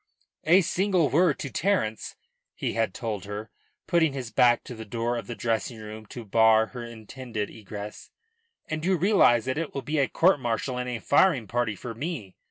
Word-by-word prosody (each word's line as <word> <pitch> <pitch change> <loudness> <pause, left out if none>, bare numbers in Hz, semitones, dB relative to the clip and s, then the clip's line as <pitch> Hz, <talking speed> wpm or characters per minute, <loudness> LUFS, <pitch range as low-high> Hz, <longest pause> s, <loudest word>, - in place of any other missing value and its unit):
"A 175 +5 +6
single 185 -3 +1
word 150 0 +3
to 135 - -5
Terence," 165 - -1 0.4
he - - -2
had 115 -3 0
told 110 -3 -4
her, 105 +2 -6 0.3
putting 165 -5 +2
his 125 -4 -5
back 120 +1 +4
to - - -8
the 110 -1 -8
door 115 +2 -2
of 120 - -5
the 120 - -5
dressing 115 0 -2
room 110 0 -9
to 120 0 -8
bar 110 +1 +5
her 120 +1 -8
intended 115 -1 -6
egress, 105 -1 -8 0.6
"and 155 0 -3
you 185 +1 +2
realise 165 - +4
that 130 +3 -1
it 165 - -4
will 135 - -3
be 150 +4 -1
a 135 - +3
court 175 -3 +3
martial 125 +1 -2
and 125 0 -3
a 125 - -2
firing 140 0 +3
party 115 0 -1
for 115 +4 -7
me." 120 - -5
120 Hz, 190 wpm, -26 LUFS, 110-150 Hz, 0.6 s, A